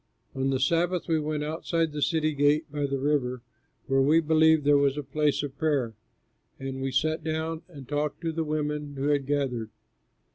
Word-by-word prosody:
On 135 0 -1
the 135 -1 0
Sabbath 170 +6 +1
we 160 -1 +2
went 150 0 -2
outside 160 +1 -1
the 150 0 -5
city 155 0 +1
gate 145 +2 +3
by 145 -1 -1
the 140 0 -1
river, 130 -3 0 0.4
where 135 -1 +2
we 150 +4 +5
believed 160 -1 +4
there 145 0 +5
was 140 0 +3
a 150 - -2
place 145 +2 0
of 140 -1 -5
prayer. 140 -8 +1 0.7
And 135 0 -5
we 135 0 -1
sat 155 +5 0
down 160 0 -2
and 140 -8 -12
talked 150 +1 -2
to 165 -1 -1
the 165 0 -2
women 150 -1 -3
who 140 +2 -1
had 140 -2 +1
gathered. 130 -6 -1
150 Hz, 190 wpm, -27 LUFS, 135-155 Hz, 0.7 s, we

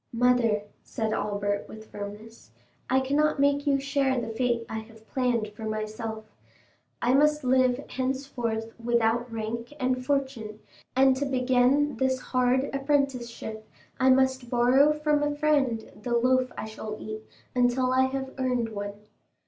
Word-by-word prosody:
"Mother," 235 -3 +2 0.2
said 220 -3 -3
Albert 205 -1 -1
with 220 0 -11
firmness. 210 - -9 0.4
"I 265 +1 +3
cannot 290 +3 +1
make 285 +1 +2
you 275 -1 +3
share 275 -1 +1
the 230 -1 -4
fate 235 0 0
I 220 - -4
have 220 0 -14
planned 245 -4 0
for 210 +1 -9
myself. 215 0 -4 0.8
I 245 - +3
must 300 +2 +3
live 255 +1 +2
henceforth 255 -4 -3
without 235 0 +1
rank 230 +2 -4
and 255 -1 0
fortune, 265 -6 -2 0.4
and 265 0 +5
to 285 - -1
begin 260 +1 +2
this 260 +1 +1
hard 255 +1 +1
apprenticeship 260 -6 -2 0.3
I 260 0 +4
must 260 -1 +3
borrow 255 +5 +5
from 300 -1 +1
a 295 0 0
friend 285 -7 +1
the 240 +2 0
loaf 255 +1 +2
I - - -4
shall 215 0 -6
eat 215 0 -6 0.3
until 255 +1 +2
I 260 0 +4
have 265 0 -4
earned 250 -3 0
one. 205 -1 -5
250 Hz, 145 wpm, -27 LUFS, 225-265 Hz, 0.8 s, and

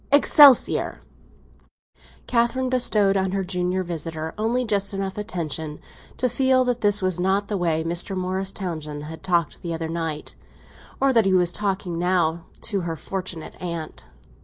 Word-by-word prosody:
—Excelsior!" 285 -2 +6 1.3
Catherine 250 +2 +1
bestowed 210 -6 +3
on 190 -1 0
her 195 -1 0
junior 180 0 -1
visitor 160 -2 -4
only 235 +4 0
just 200 -2 +1
enough 195 -1 -3
attention 160 -7 -4 0.4
to 255 - +1
feel 255 +1 +2
that 245 -1 -1
this 205 -1 +3
was 185 -2 0
not 195 +2 0
the 210 - -1
way 165 -4 0
Mr. 175 +3 0
Morris 190 +1 -2
Townsend 155 -7 -5
had 160 +1 -9
talked 170 -4 0
the 170 -1 -3
other 160 0 -4
night, 165 -2 -3 0.7
or 270 0 +3
that 230 -4 +4
he 190 -1 +3
was 175 -1 +3
talking 190 -4 -2
now 170 -2 0 0.2
to 200 -3 -2
her 170 -2 -3
fortunate 180 -2 -6
aunt. 170 -3 -6
185 Hz, 155 wpm, -23 LUFS, 170-210 Hz, 1.3 s, Excelsior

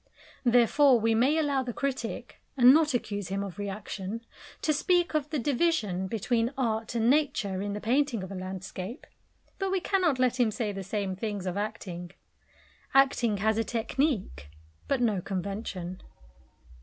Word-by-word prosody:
Therefore 245 +2 +5
we 225 +1 +2
may 260 +8 +3
allow 285 -4 +1
the 250 -2 -4
critic 250 -3 -4 0.2
and 250 0 +8
not 305 -3 +3
accuse 205 -5 -2
him 195 +1 -2
of 200 0 -7
reaction 205 +1 -5 0.4
to 310 - +3
speak 350 +3 +2
of 300 -1 0
the 305 - -1
division 240 - 0
between 230 +3 0
art 225 -3 -1
and 230 0 +2
Nature 250 -9 +1
in 205 0 -3
the 210 - -3
painting 245 -1 +1
of 190 - -7
a - - -5
landscape, 185 +3 -6 0.5
but 390 -1 0
we 380 0 +1
cannot 355 -6 +1
let 255 0 +1
him 240 -3 +4
say 215 0 -2
the 195 -1 -5
same 195 0 -3
things 205 -1 -4
of 180 -1 -2
acting. 200 -4 -4 0.9
Acting 260 -6 +4
has 220 +2 +1
a - - +2
technique, 225 - -1 0.4
but 275 -3 +1
no 215 -6 +1
convention. 185 -1 -4
225 Hz, 160 wpm, -28 LUFS, 200-270 Hz, 0.9 s, and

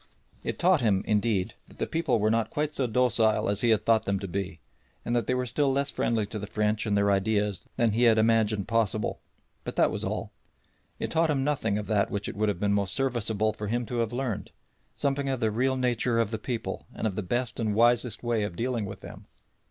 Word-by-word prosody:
It - - -3
taught 180 -2 +3
him, 100 -5 +2
indeed, 105 -3 +1
that - - -18
the - - -1
people 150 -7 0
were 110 0 +2
not 115 0 +1
quite 150 0 -2
so 130 - +1
docile 115 -2 +2
as 100 0 +2
he 120 - +3
had 110 -2 +2
thought 115 -1 +3
them 100 0 0
to 100 0 -5
be, 90 -3 -4 0.5
and 120 - 0
that 120 -4 0
they 125 - +1
were 125 0 -1
still 140 +3 +1
less 140 +1 0
friendly 115 -5 0
to 105 +1 -6
the 105 - -6
French 105 +1 0
and 105 -1 +2
their 100 0 +3
ideas 105 0 0
than 115 -2 +2
he 120 +4 +2
had 115 -2 +5
imagined 110 -2 +2
possible; 115 -5 0 0.4
but - - -6
that - - +3
was - - -4
all. - - -3 0.7
It - - -4
taught 165 0 +2
him 135 -3 +1
nothing 130 -8 0
of 105 - -3
that 105 -2 +1
which 100 0 -3
it - - -5
would 105 +1 +1
have 100 -4 -2
been 100 0 +1
most 100 -1 +1
serviceable 110 -5 +1
for 105 - -5
him 120 +3 -1
to 120 - -4
have 115 -1 0
learned 120 -4 -3 0.5
something 140 -1 -1
of 130 -2 -1
the 110 -2 +1
real 130 +4 +1
nature 120 -2 +1
of 115 -2 +1
the 110 - -3
people 120 0 -4
and - - -3
of 105 - 0
the 105 - -3
best 120 +6 -2
and 110 -3 0
wisest 120 +1 +2
way 120 -2 0
of 105 -4 -3
dealing 120 0 -1
with 95 0 -8
them. - - -11
110 Hz, 235 wpm, -27 LUFS, 105-125 Hz, 0.7 s, had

